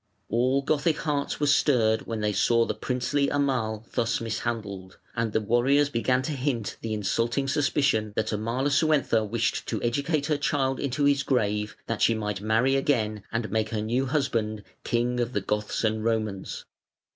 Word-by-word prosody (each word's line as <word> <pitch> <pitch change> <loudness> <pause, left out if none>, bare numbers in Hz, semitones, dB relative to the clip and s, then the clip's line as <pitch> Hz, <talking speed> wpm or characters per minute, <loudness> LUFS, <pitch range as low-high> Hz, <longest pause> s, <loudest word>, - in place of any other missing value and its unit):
All 130 +4 +2
Gothic 150 +2 +1
hearts 145 -2 -2
were 145 - +1
stirred 125 -6 +3
when 115 -2 -3
they 105 0 0
saw 115 +2 +3
the - - -2
princely 130 +3 -1
Amal 125 -6 -1
thus 115 -2 0
mishandled, 110 -4 -4 0.2
and 115 -2 -1
the 110 - +2
warriors 130 +7 +3
began 125 0 +1
to 155 - -3
hint 130 -5 -2
the 115 - -4
insulting 115 +6 0
suspicion 135 -6 +1
that 110 - -1
Amalasuentha 130 +2 +1
wished 115 +2 -1
to - - -2
educate 140 +5 0
her 150 0 +1
child 135 -2 0
into 140 +1 0
his 140 -1 +3
grave, 105 -6 0
that 115 - -3
she 115 - +4
might 105 -3 -3
marry 115 +5 +2
again 110 -7 0
and 115 -1 -2
make 110 0 0
her 110 -2 -2
new 125 +5 0
husband 115 -7 -1 0.2
king 120 +1 0
of 120 +1 -1
the 100 - 0
Goths 105 +3 -2
and 110 0 0
Romans. 110 -4 -2
120 Hz, 170 wpm, -26 LUFS, 110-140 Hz, 0.2 s, she